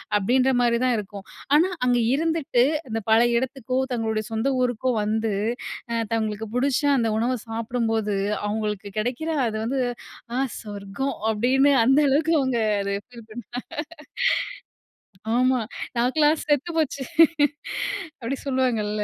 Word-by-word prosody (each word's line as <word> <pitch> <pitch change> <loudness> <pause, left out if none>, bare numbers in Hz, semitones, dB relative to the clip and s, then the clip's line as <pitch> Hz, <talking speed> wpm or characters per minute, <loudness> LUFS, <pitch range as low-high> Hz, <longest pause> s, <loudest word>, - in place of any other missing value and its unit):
அப்படின்ற 250 +6 +3
மாரி 235 -1 +3
தான் 250 -2 +2
இருக்கும். 200 -1 -7 0.3
ஆனா 335 +5 +4 0.2
அங்க 245 -1 +3
இருந்துட்டு 315 -5 +1 0.2
அந்த 225 -1 -2
பழைய 235 +1 +5
இடத்துக்கோ, 260 -1 -3
தங்களுடைய 220 -2 -1
சொந்த 225 +4 -1
ஊருக்கோ 250 0 0
வந்து 220 0 0 0.6
அ - - -1 0.2
தங்களுக்குப் 220 0 -2
புடிச்ச 275 +2 +1 0.2
அந்த 230 -3 +1
உணவ 245 +3 +1
சாப்புடும்போது 225 -2 -1 0.3
அவங்களுக்கு 210 -1 -2
கெடைக்கிற, 245 +9 -2 0.2
அது 220 - -3
வந்து 260 +2 0 0.5
ஆ - - +1 0.2
சொர்க்கம்! 205 +5 -4 0.2
அப்படின்னு 265 +6 +3
அந்த 270 +3 +5
அளவுக்கு 315 +4 +2
அவங்க 260 -3 0 0.2
அத 200 0 -2
ஃபீல் 235 -3 -13
பண்ணுவாங்க. 240 +2 -6 1.8
ஆமா 255 0 +3 0.4
நாக்குலாம் 295 +5 +3
செத்துப்போச்சு 310 +2 +2 1.4
அப்படி 240 +4 -2
சொல்லுவாங்கள்ல. 225 -6 0
240 Hz, 120 wpm, -24 LUFS, 220-265 Hz, 1.8 s, பழைய